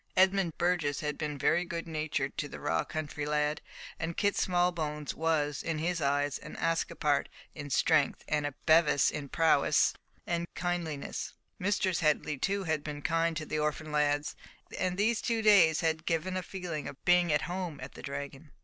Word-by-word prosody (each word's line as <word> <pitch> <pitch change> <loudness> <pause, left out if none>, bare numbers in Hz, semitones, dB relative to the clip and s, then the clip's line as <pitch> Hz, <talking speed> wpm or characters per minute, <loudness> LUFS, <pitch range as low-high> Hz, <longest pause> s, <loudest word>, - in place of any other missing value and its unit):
Edmund 190 -3 +3
Burgess 170 -5 +1
had 150 -1 -2
been 150 -2 -4
very 175 +5 +2
good 170 -1 -5
natured 155 -3 -2
to 145 - -2
the - - -8
raw - - 0
country 150 -1 -4
lad, 150 0 0 0.4
and 165 0 -3
Kit 205 -1 +2
Smallbones 170 -5 0
was, 155 -3 0
in 165 -2 -2
his 170 +1 -1
eyes, 145 0 +1
an 150 - -10
Ascapart 165 -3 0 0.3
in 145 -2 -7
strength, 145 +3 +2
and 150 -1 0
a 145 - -7
Bevis 155 -3 +5
in 145 -2 -5
prowess 160 -3 +3 0.3
and 170 0 -1
kindliness. 175 -5 -3 0.2
Mistress 190 -2 +1
Headley 150 -2 +1
too 200 +4 0
had 160 -4 -1
been 145 -1 -6
kind 165 0 +1
to 155 - -4
the 155 - -2
orphan 150 +1 -2
lads, 145 0 +1 0.4
and 180 0 0
these 220 +2 +2
two 230 -2 0
days 180 -7 +6
had 160 -1 -1
given 170 +3 0
a 185 - -1
feeling 175 -6 -5
of 140 - -10
being 175 -1 +4
at 150 - +2
home 175 -4 -4
at 130 +2 -8
the - - -11
Dragon. 140 +1 -6
160 Hz, 175 wpm, -30 LUFS, 150-175 Hz, 0.4 s, days